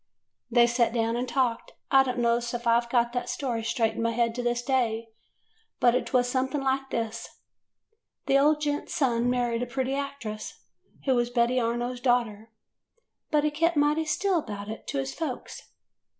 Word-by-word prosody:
"They 240 0 +5
sat 235 -1 +1
down 230 -1 0
and 245 +1 -2
talked. 240 -2 -1 0.2
I 270 - +7
don't 255 -1 -2
know 235 -1 +2
's 235 0 -5
I - - +1
Ve 235 0 +2
got 235 -1 +2
that 245 - -2
story 240 -5 -2
straight 225 0 0
in - - -4
my 230 - +1
head 230 0 +1
to 245 - -3
this 240 0 -1
day, 230 -4 0 0.7
but 245 -2 +5
't 250 - -1
was 245 -1 +3
something 265 +3 -1
like 270 0 -1
this: 230 -1 -3 1.0
The 275 - +4
old 300 +2 +3
gent's 290 -1 -2
son 245 -3 +1
married 240 -1 0
a 245 - -2
pretty 260 +2 -2
actress, 275 -6 -5 0.4
who 265 - +3
was 240 -1 +1
Betty 245 +1 +2
Arno's 240 +1 -2
daughter, 230 -4 0 0.8
but 300 -1 +2
he 300 - +1
kept 330 +2 +1
mighty 295 +2 +2
still 370 +3 +1
about 205 -6 -6
it 220 - -8
to 280 - -3
his 270 0 -2
folks. 300 -7 -6
245 Hz, 185 wpm, -27 LUFS, 235-270 Hz, 1.0 s, I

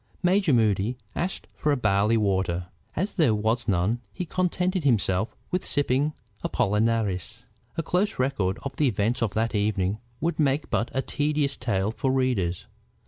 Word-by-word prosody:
Major 185 -1 +3
Moody 110 -1 +2 0.2
asked 185 +2 -2
for 150 -1 +1
barley 105 -2 +2
water. 95 -4 0 0.3
As 190 +6 -1
there 140 - +4
was 110 +3 0
none, 100 +5 +1
he 180 - -4
contented 180 +1 0
himself 110 -5 +1 0.2
with 180 0 0
sipping 145 +1 +1 0.3
Apollinaris. 110 0 0 0.3
A 165 - 0
close 190 +6 0
record 115 -8 0
of 140 - -5
the 150 - +3
events 115 +1 0
of 115 -4 0
that 115 +1 +1
evening 100 -1 0 0.2
would 170 +1 -1
make 145 0 +1
but 120 - +1
a 135 - +1
tedious 145 -1 0
tale 105 -5 0
for 130 +3 -1
readers. 120 -10 0
115 Hz, 150 wpm, -26 LUFS, 100-145 Hz, 0.3 s, there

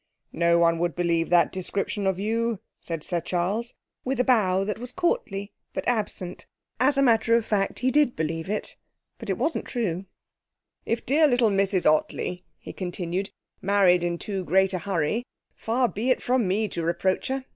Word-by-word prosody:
'No 170 0 +3
one 165 -1 +3
would 175 -1 -1
believe 170 -1 +1
that 175 -1 +4
description 195 +2 -2
of 190 -2 +1
you,' 225 +3 0 0.2
said 165 -3 -5
Sir 175 -2 -2
Charles, 185 +8 -2 0.3
with 265 0 -2
a - - +4
bow 195 -7 +3
that 210 +2 -3
was 245 +1 -6
courtly 250 - -1 0.2
but - - -3
absent. 210 -6 -2 0.3
As 275 +2 +3
a 275 - +4
matter 230 -2 +4
of 230 -2 +1
fact, 200 -3 0
he 255 +1 +1
did 290 -3 +3
believe 160 +2 -3
it, 210 0 -3 0.4
but 225 - -8
it 190 - 0
wasn't 315 +7 -1
true. 195 -6 -2 0.8
'If 230 - -1
dear 300 +4 +4
little 245 -5 +3
Mrs 195 -1 +1
Ottley,' 165 +3 +1
he - - -10
continued, 180 +1 -3 0.3
'married 185 -3 +4
in 175 0 -1
too 195 +1 -4
great 190 +2 +3
a 185 - -1
hurry, 185 +4 -1 0.3
far 245 +3 +1
be 220 +5 -2
it 255 - +3
from 250 -4 +2
me 210 +4 +1
to 170 - -3
reproach 175 +3 0
her. 265 0 -3
195 Hz, 180 wpm, -25 LUFS, 175-235 Hz, 0.8 s, that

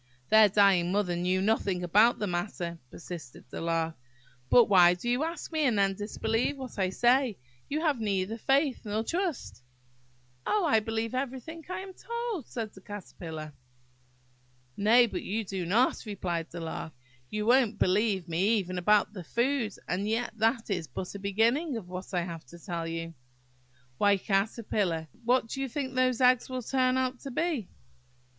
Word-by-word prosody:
"Their 220 -1 +7
dying 195 -3 +4
mother 195 -3 +1
knew 180 +2 0
nothing 195 -4 +1
about 210 +7 +5
the 210 - -2
matter," 175 -2 -3
persisted 165 -6 -9
the - - -5
Lark; 165 -1 -1 0.5
"but 240 - +7
why 180 -3 +6
do 180 +7 -7
you 245 +4 +1
ask 335 +2 -4
me, 315 - -1
and 240 -6 +2
then 195 -1 +3
disbelieve 220 +6 -1
what 255 -5 -8
I 190 -1 +2
say? 240 +2 +2 0.3
You 305 +2 -1
have 300 -6 +1
neither 205 +1 -1
faith 275 +2 +2
nor 215 0 -2
trust." 335 - -3 0.8
"Oh, 415 -4 +1
I 250 -8 +4
believe 225 +1 -3
everything 265 +5 -4
I 370 - -3
am 385 0 -9
told," 470 - -4
said 225 -4 -5
the 190 - -14
Caterpillar. 165 -6 -8 1.2
"Nay, 230 +4 +5
but 190 -6 -4
you 220 +3 -2
do 185 -3 -4
not," 230 +8 +2
replied 175 -5 -3
the 170 - -7
Lark; 160 -1 -5 0.4
"you 210 0 -2
won't 240 -3 +4
believe 195 -2 +1
me 190 +7 +2
even 185 -2 -3
about 210 +3 +3
the 185 -4 -7
food, 235 - 0
and 190 +3 -1
yet 230 +2 -1
that 225 0 +1
is 175 -5 -2
but 180 +8 -6
a 200 - -7
beginning 230 - +1
of 200 -6 -8
what 185 +1 -7
I 180 -2 0
have 170 -2 -7
to 170 - -12
tell 170 -1 -4
you. 165 0 -4 0.9
Why, 205 -1 +4
Caterpillar, 195 -5 -1 0.2
what 250 0 +3
do 270 +4 -5
you 270 - -2
think 260 +1 -3
those 255 -2 +2
little 250 -1 +8
eggs 255 0 -5
will 255 -1 -4
turn 255 +1 +2
out 255 -1 -1
to 275 - -7
be?" 285 - -1
210 Hz, 175 wpm, -29 LUFS, 180-255 Hz, 1.2 s, little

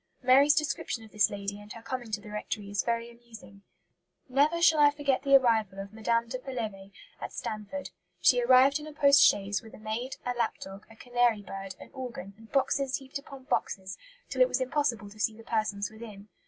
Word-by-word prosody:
Mary's 275 +4 +6
description 285 -6 -2
of 220 - -15
this 210 -2 +3
lady 200 0 -5
and 205 0 -10
her 230 - -10
coming 240 0 -5
to 210 -1 -2
the 210 0 -12
rectory 210 -1 -5
is 205 - +1
very 235 0 -2
amusing: 225 -5 -15 0.7
"Never 290 +6 +2
shall 320 -2 +5
I 290 -1 +7
forget 285 -3 0
the 275 0 +5
arrival 220 -7 +3
of 195 +1 -7
Mme. 230 +1 0
de 255 +2 -5
Pelevé 220 -7 -6 0.3
at - - -6
Stanford. 215 +6 -6 0.3
She 245 -1 +4
arrived 260 +4 +5
in 300 - -9
a 305 - -9
post 285 -1 +5
chaise 200 -1 +3
with 220 - -13
a - - -13
maid, 225 +5 -4
a 245 - -1
lap 235 -2 -1
dog, 195 +2 -10
a 225 - -15
canary 240 -3 +1
bird, 195 -1 -7
an - - -13
organ, 240 -7 -7
and 220 +1 -17
boxes 275 0 +1
heaped 270 0 -6
upon 275 -1 -12
boxes 190 -6 -2 0.3
till - - -2
it - - +7
was - - -1
impossible 255 -5 -1
to 215 - -15
see 220 0 0
the 225 - -12
persons 215 -3 -2
within. 215 -2 -11
230 Hz, 210 wpm, -29 LUFS, 210-265 Hz, 0.7 s, I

